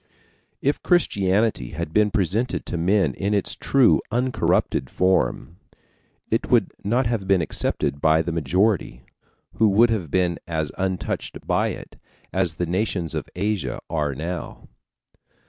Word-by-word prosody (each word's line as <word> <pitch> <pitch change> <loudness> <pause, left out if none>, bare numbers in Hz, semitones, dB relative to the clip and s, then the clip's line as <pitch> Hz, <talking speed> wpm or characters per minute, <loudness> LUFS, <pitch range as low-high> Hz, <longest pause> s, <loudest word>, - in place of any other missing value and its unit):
If 140 +2 +1
Christianity 100 - +1
had 85 -2 -4
been 105 0 +4
presented 105 +3 -1
to - - -4
men 85 -3 +2
in 100 +10 -1
its 100 - 0
true, 135 -3 +3
uncorrupted 125 - 0
form, 90 -3 0 0.7
it - - 0
would - - +3
not 120 +6 +1
have 110 -4 -1
been 95 -1 +4
accepted 70 -2 -2
by 80 +1 +4
the 85 - -3
majority, 85 - 0 0.5
who 110 -1 +4
would 115 +4 +4
have 95 -9 -2
been 90 0 +1
as 80 -3 -2
untouched 95 -1 -3
by - - +1
it - - -7 0.4
as 90 -4 0
the 90 - -1
nations 90 -1 -1
of - - -4
Asia 95 - -2
are 75 -4 -1
now. 85 +5 -6
95 Hz, 140 wpm, -23 LUFS, 80-105 Hz, 0.7 s, been